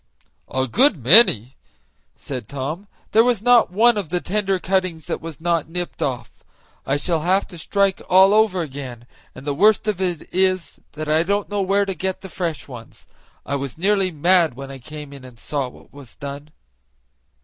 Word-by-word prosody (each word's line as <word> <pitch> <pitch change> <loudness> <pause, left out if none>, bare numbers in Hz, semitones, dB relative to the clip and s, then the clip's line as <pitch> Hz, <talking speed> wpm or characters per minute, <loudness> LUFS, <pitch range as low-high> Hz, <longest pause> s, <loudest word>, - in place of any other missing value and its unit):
"A 130 0 -1
good 245 - +3
many!" 130 - +6 0.6
said 125 -6 -7
Tom; 145 +8 -5 0.2
"there 220 +1 +5
was 245 -3 +2
not 245 -4 +5
one 220 +5 +3
of 195 -7 -3
the 180 - -1
tender 195 +1 -1
cuttings 185 -4 -1
that - - -4
was 165 -2 -8
not 170 -2 -1
nipped 175 +1 -5
off. 125 -3 -4 0.4
I 135 - +1
shall 165 +2 -1
have 185 +5 +1
to 175 - -10
strike 195 +2 0
all 190 +2 +6
over 210 -5 +3
again, 130 -5 -8 0.3
and 130 - -11
the 145 - -1
worst 215 +7 +3
of 200 -3 -1
it 175 -4 -2
is 185 -2 0
that 155 +1 -6
I 155 +1 +3
don't 200 +4 -1
know 205 -1 -1
where 200 +1 +1
to 195 - -3
go 190 +2 -2
to - - -29
get 190 -2 -10
fresh 165 -6 -4
ones. 120 -4 -12 0.4
I 140 - -2
was 140 0 -6
nearly 195 +1 +1
mad 170 -2 +2
when 135 +1 -8
I 135 - -9
came 150 +2 -10
in 140 -2 -12
and 125 -2 -13
saw 140 +2 -3
what - - -19
was 140 -4 -13
done." 140 +1 -8
170 Hz, 195 wpm, -21 LUFS, 140-195 Hz, 0.6 s, many